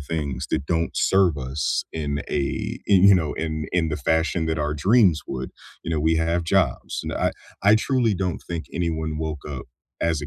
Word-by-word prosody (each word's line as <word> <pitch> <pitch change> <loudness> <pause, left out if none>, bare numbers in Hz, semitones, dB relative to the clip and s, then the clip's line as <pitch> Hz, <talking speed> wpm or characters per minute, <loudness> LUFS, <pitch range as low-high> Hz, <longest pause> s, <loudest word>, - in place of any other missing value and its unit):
things 70 -4 -3
that 70 - 0
don't 85 +1 0
serve 95 -5 +3
us 65 +1 -1
in 70 -2 -2
a 70 -2 -2
in, 95 -3 +5
you 100 -1 +8
know, 80 -4 0
in 80 -2 -3
in 85 -3 +1
the 75 - -2
fashion 80 +3 0
that 80 -1 -1
our 75 0 0
dreams 90 - +4
would, 65 0 -5 0.3
you - - -5
know, 80 - 0
we 80 +2 +3
have 85 +1 0
jobs, 85 -7 0
and - - -4
I - - 0 0.3
I 100 +2 +6
truly 115 -1 +2
don't 90 -2 -2
think 85 -2 -6
anyone 80 -2 -2
woke 80 -2 -4
up 70 -4 -6 0.3
as 80 -3 0
a - - -4
80 Hz, 200 wpm, -23 LUFS, 75-90 Hz, 0.3 s, you